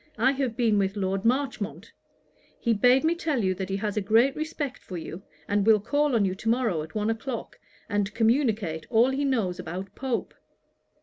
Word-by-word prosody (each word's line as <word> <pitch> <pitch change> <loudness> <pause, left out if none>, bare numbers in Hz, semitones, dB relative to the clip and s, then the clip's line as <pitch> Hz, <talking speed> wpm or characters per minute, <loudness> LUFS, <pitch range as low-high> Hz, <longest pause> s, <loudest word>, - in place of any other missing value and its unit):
I 250 +5 +4
have 265 -4 -2
been 225 -4 +3
with 195 0 0
Lord 195 0 -1
Marchmont. 255 -3 -1 0.7
He 235 - +2
bade 250 +6 +4
me 325 +1 +3
tell 310 - -1
you 185 -1 +1
he 195 - -2
has 205 0 -2
a - - +2
great 225 +7 +3
respect 305 -3 -4
for 185 - -7
you, 170 +2 -7 0.3
and 205 0 +1
will 215 0 +5
call 290 +5 +1
on 210 -3 +3
you 185 - 0
to 215 +4 -3
morrow 230 -9 +1
at 155 +5 -10
one 215 +1 +1
o'clock, 230 +1 -5 0.3
and 205 -1 0
communicate 220 - +1
all 240 +3 +4
he 275 +2 -1
knows 225 -10 0
about 185 +4 -6
Pope.' 260 -3 -3
225 Hz, 190 wpm, -26 LUFS, 195-265 Hz, 0.7 s, will